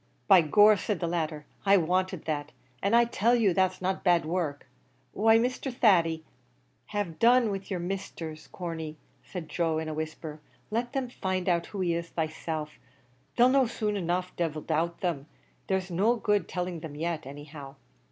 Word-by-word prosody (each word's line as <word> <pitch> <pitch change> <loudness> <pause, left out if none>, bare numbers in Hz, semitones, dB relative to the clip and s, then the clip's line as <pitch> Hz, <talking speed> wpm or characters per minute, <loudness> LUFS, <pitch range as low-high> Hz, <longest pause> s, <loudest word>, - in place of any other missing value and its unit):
"By 185 - +8
gor," 205 +7 +6
said 200 -1 -2
the - - -1
latter, 155 -3 -2 0.2
"I 200 0 +6
wanted 185 +1 0
that; 150 -1 -3 0.3
an' 200 +4 +2
I 235 0 +6
tell 235 +1 +2
you 215 -6 +3
that's 185 0 +1
not 190 +1 -1
bad 175 -3 +3
work. 155 -5 -2 0.5
Why, 225 +2 +5
Mr. 255 +3 -1
Thady 170 -9 +3 0.3
" - - -40
"Have 205 -6 -3
done 240 -1 +5
with 195 -1 -5
your 185 -3 -2
Misthers, 170 -4 -5
Corney," 160 -3 -6 0.3
said 175 -4 -7
Joe, 165 -1 0
in 160 0 -3
a 155 - -3
whisper, 155 0 -6 0.3
"let 240 +3 -1
them 270 -2 -1
find 185 -6 -3
out 170 -2 +1
who 200 - -5
he 175 -2 +1
is 170 0 -3
theyselves. 155 -1 -3 0.6
They'll 245 +1 +6
know 265 -1 +4
soon 215 -2 -2
enough, 180 -1 -2
divil 155 -3 -2
doubt 170 +2 -1
them! 160 -6 -2 0.4
there's 190 -1 -1
no 205 +8 +3
good 210 -5 +1
telling 180 -2 -3
them 155 -2 -8
yet, 160 -2 -3
any 145 +1 -8
how." 145 -2 -10
175 Hz, 180 wpm, -28 LUFS, 160-205 Hz, 0.6 s, By